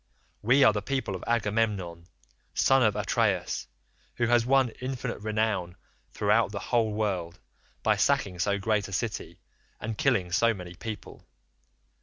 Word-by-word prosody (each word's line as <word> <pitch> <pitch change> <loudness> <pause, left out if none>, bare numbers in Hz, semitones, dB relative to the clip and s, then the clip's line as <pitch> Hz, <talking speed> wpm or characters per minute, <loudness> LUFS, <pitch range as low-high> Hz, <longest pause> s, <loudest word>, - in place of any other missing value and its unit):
We 130 +6 +4
are 120 - +6
the 105 - -2
people 120 -3 -2
of 90 - -7
Agamemnon, 105 -7 -1 0.5
son 135 0 +4
of 110 -4 +3
Atreus, - - 0 0.5
who 120 - +1
has 120 0 +3
won 135 -1 +4
infinite 130 -1 -4
renown 105 -4 -1 0.3
throughout 105 +1 +2
the 105 - -5
whole 115 +1 0
world, 95 -5 -2 0.5
by - - +3
sacking 90 -3 +1
so 100 +3 +1
great 105 +1 0
a 100 - -9
city 115 +3 -3 0.4
and 110 +1 -4
killing 105 -10 +1
so 115 +5 +3
many 90 -2 -8
people. 105 +3 -8
110 Hz, 145 wpm, -28 LUFS, 95-120 Hz, 0.5 s, are